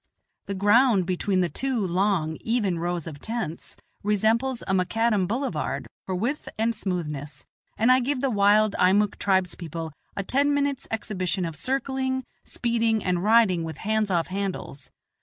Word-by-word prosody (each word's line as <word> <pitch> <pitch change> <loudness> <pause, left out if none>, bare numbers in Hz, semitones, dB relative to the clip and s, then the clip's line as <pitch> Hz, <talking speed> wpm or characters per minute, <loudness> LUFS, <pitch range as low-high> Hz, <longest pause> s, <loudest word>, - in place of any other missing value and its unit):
The 200 - -3
ground 205 0 +4
between 185 +1 0
the 180 - +2
two 265 +7 -2
long, 185 -4 0
even 210 -7 0
rows 175 -1 -2
of 150 -4 -8
tents 220 -8 -5 0.2
resembles 225 +5 +1
a 190 - -2
macadam 205 +1 +1
boulevard 175 - -2 0.2
for 190 - -1
width 240 +11 -2
and 225 +2 +1
smoothness, 150 -9 -4 0.3
and 230 +3 +4
I 255 - +6
give 260 +2 -1
the 270 0 0
wild 205 0 +4
Eimuck 200 +3 +3
tribes 190 -3 +2
people 165 -2 -6 0.2
a 200 - -1
ten 285 +7 +2
minutes' 280 -2 -1
exhibition 185 -5 -2
of 165 -2 -5
circling, 260 - -1 0.2
speeding, 230 -2 0
and 180 -1 0
riding 210 -6 +4
with 160 -2 -6
hands 215 0 0
off 170 -3 +1
handles. 185 -8 -4
200 Hz, 155 wpm, -25 LUFS, 180-235 Hz, 0.3 s, I